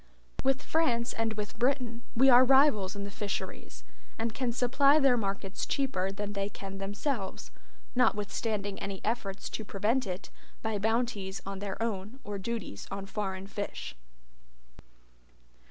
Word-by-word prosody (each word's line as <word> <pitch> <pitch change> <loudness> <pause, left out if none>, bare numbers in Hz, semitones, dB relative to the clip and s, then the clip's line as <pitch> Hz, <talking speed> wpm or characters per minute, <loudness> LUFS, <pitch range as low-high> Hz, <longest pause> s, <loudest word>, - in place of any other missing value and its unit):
With 270 +1 +2
France 240 -8 +2
and 225 -1 0
with 210 +1 -5
Britain 245 -2 +1
we 260 +3 +6
are 250 -1 +9
rivals 265 -7 +5
in 200 - -4
the 200 - -5
fisheries, 200 -1 -4 0.3
and 225 0 -1
can 250 -1 0
supply 270 +4 +5
their 275 -4 +5
markets 200 -3 -2
cheaper 220 -9 0
than 205 +1 -4
they 200 0 -1
can 195 -1 -7
themselves, 205 +2 -3 0.4
notwithstanding 210 -3 +1
any 195 -1 -4
efforts 210 -4 -2
to 220 - -3
prevent 210 +5 +1
it 185 +1 -5 0.3
by 220 -2 0
bounties 215 -3 0
on 195 0 -4
their 200 -1 -4
own 215 +2 -3
or 205 -1 -4
duties 195 - -4
on 195 0 -4
foreign 195 -1 -3
fish. 205 - -5
210 Hz, 140 wpm, -31 LUFS, 195-245 Hz, 0.4 s, are